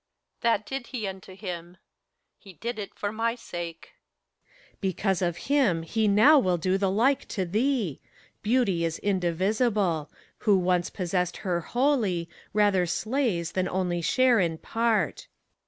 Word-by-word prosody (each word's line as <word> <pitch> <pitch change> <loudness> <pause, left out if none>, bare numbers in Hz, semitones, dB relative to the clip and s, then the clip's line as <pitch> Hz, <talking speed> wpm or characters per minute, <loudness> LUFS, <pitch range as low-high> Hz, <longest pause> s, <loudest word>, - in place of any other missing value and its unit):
That 230 -2 +2
did 270 -1 -5
he 240 -5 -4
unto 190 -1 -7
him: 180 -3 -7 0.6
he 195 - -14
did 235 +7 -5
it 200 - -7
for 205 - -3
my 230 +2 -1
sake. 175 - -7
PHORKTAS. - - -34
Because 190 0 0
of 175 -2 0
him 260 - +2
he 220 +6 0
now 220 +10 +7
will 180 -7 +1
do 185 +3 0
the 195 -1 +2
like 240 +8 +2
to 190 -4 -2
thee. 215 - 0 0.4
Beauty 210 -7 +1
is 165 -1 -1
indivisible: 190 - 0 0.3
who 205 -4 +4
once 180 -1 +1
possessed 180 -1 -1
Her 175 -2 0
wholly, 225 - +1 0.2
rather 200 -4 +3
slays 215 - -1
than 185 0 -1
only 180 -2 -1
share 250 +5 +3
in 165 -3 0
part. 225 -4 0
195 Hz, 145 wpm, -27 LUFS, 175-230 Hz, 0.6 s, now